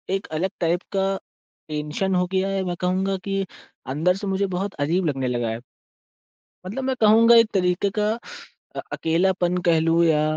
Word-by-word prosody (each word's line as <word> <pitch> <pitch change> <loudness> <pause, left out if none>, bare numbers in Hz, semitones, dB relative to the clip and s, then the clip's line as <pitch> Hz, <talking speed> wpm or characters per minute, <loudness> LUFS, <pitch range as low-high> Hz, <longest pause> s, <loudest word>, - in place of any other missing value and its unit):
एक 195 - -4
अलग 190 +4 0
टाइप 170 +1 +1
का 195 0 +1 0.5
टेंशन 150 +6 -2
हो 180 0 +2
गया 190 0 +1
है 195 -1 -1
मैं 180 -1 -3
कहूँगा 190 +2 0
कि 195 -1 -1 0.5
अंदर 170 +6 +2
से 200 +1 -5
मुझे 195 +1 0
बहुत 195 +2 -3
अजीब 165 +5 +1
लगने 135 -4 -1
लगा 120 -2 -1
है। 115 +1 -4 1.1
मतलब 230 +8 -4
मैं 265 0 0
कहूँगा 225 +2 +6
एक 230 -1 +6
तरीक़े 180 +1 +1
का 210 0 +2 0.7
अ, - - -1
अकेलापन 175 +2 +1
कह 165 - +5
लूँ 165 +1 +3
या 155 -2 +3
185 Hz, 175 wpm, -23 LUFS, 165-195 Hz, 1.1 s, कहूँगा